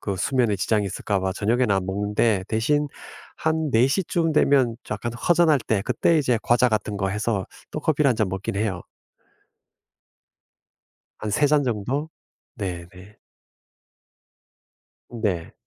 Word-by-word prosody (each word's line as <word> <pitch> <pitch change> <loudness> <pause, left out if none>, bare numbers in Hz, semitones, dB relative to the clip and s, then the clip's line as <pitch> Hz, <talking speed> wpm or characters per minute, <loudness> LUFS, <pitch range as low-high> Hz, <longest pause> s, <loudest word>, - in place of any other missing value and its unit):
그 100 -2 -3
수면에 120 +2 +1
지장이 105 +2 +1
있을까 100 +1 -2
봐 95 0 -1
저녁에는 115 +3 +1
안 95 -1 0
먹는데 105 +1 0
대신 145 +7 +1 0.5
한 160 -1 0
4 115 +3 +5
시쯤 165 +1 0
되면 135 -6 +3
약간 105 +3 -3
허전할 165 +2 +3
때 110 -3 -1
그때 165 +7 +2
이제 125 -5 +1
과자 120 +1 +3
같은 105 -2 -2
거 95 -1 0
해서 105 -1 -1 0.2
또 150 - -4
커피를 150 -2 +2
1 120 - 0
잔 110 -3 +1
먹긴 95 +1 -4
해요. 100 -4 -2 2.4
한 105 - -4
3 150 +7 +3
잔 150 -1 +3
정도? 125 +6 -2 0.5
네네. 95 -1 -7 1.9
네. 105 -8 -3
110 Hz, 225 characters per minute, -24 LUFS, 100-140 Hz, 2.4 s, 4